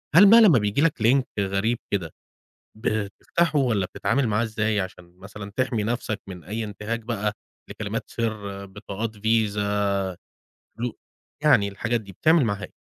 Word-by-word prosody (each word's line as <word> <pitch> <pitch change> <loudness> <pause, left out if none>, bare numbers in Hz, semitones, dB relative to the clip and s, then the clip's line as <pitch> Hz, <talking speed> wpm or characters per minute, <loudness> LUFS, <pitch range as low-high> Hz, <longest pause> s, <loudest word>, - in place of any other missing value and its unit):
هل 190 +5 +10
بقى 230 +1 +9
لما 170 - +7
بييجي 105 +6 0
لَك 155 -8 +1
Link 130 +4 +5 0.2
غريب 100 +4 0
كده 90 -6 -1 0.7
بتفتحه 110 +9 0
والّا 110 -8 +1
بتتعامل 135 +7 0
معاه 110 +2 +1
إزاي 110 -1 0
عشان 90 -1 -7
مثلًا 100 +1 -9
تحمي 125 -5 0
نفسَك 110 -1 -2
من 90 -3 -9
أي 110 +4 -4
انتهاك 105 +2 -4
بقى 105 -2 -2 0.4
لكلمات - - -4
سر، 100 -4 -4
بطاقات 100 +3 -5
VISA 105 -2 +1 0.9
فلو 120 0 -3 0.5
يعني 105 -9 +5
الحاجات 115 +4 -1
دي، 100 -2 -12
بتعمل 160 - +4
معاها 100 -2 -2
إيه؟ - - -10
110 Hz, 150 wpm, -24 LUFS, 100-120 Hz, 0.9 s, هل